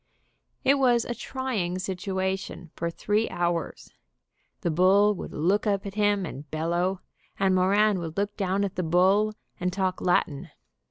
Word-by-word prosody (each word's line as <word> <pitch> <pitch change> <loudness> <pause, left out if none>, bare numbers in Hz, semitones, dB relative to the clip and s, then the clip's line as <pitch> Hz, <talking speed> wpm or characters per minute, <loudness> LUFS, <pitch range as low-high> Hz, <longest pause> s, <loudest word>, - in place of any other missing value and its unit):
It 275 +1 +4
was 245 -3 +3
a 240 - -3
trying 230 -8 -3
situation 190 -2 -3
for 170 - -2
three 210 +6 0
hours. 170 -2 -3 0.7
The 170 - 0
bull 195 +5 +4
would 195 - -7
look 190 +8 +1
up 200 -1 0
at 200 - -5
him 205 -2 +1
and 145 -1 -8
bellow, 175 +4 -1 0.4
and 195 -1 +2
Moran 195 +2 +3
would 165 0 -6
look 205 +1 -1
down 195 0 0
at 195 -2 -3
the - - +1
bull 190 +5 +3 0.3
and 180 0 -1
talk 185 0 -1
Latin. 155 -5 0
190 Hz, 155 wpm, -26 LUFS, 175-205 Hz, 0.7 s, It